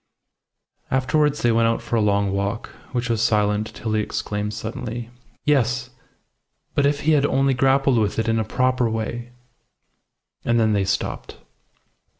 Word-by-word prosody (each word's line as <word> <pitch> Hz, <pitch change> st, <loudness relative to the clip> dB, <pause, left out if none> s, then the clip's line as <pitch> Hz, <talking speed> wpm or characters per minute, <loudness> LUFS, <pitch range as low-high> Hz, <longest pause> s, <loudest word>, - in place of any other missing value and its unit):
Afterwards 145 Hz, +3 st, +1 dB
they 120 Hz, -, +4 dB
went 115 Hz, 0 st, +3 dB
out 115 Hz, -, +1 dB
for -, -, -3 dB
a 115 Hz, -, +3 dB
long 100 Hz, -1 st, +2 dB
walk, 100 Hz, +3 st, -2 dB, 0.2 s
which 125 Hz, -1 st, -1 dB
was 115 Hz, -2 st, 0 dB
silent 105 Hz, -2 st, +2 dB
till 110 Hz, -1 st, -3 dB
he 110 Hz, -, +2 dB
exclaimed 105 Hz, -1 st, -3 dB
suddenly 115 Hz, +2 st, -5 dB, 0.3 s
"Yes. 125 Hz, -3 st, +1 dB, 0.8 s
But 140 Hz, -1 st, +3 dB
if 145 Hz, 0 st, 0 dB
he 160 Hz, -, +2 dB
had 145 Hz, -3 st, +4 dB
only 135 Hz, 0 st, +2 dB
grappled 135 Hz, -1 st, +3 dB
with 105 Hz, -2 st, 0 dB
it 115 Hz, 0 st, 0 dB
in 115 Hz, 0 st, +2 dB
a -, -, +1 dB
proper 125 Hz, +2 st, +1 dB
way!" 115 Hz, +2 st, -4 dB, 1.1 s
And 120 Hz, 0 st, +2 dB
then 110 Hz, -1 st, +3 dB
they 100 Hz, -1 st, +1 dB
stopped. -, -, -3 dB
115 Hz, 160 wpm, -22 LUFS, 110-130 Hz, 1.1 s, they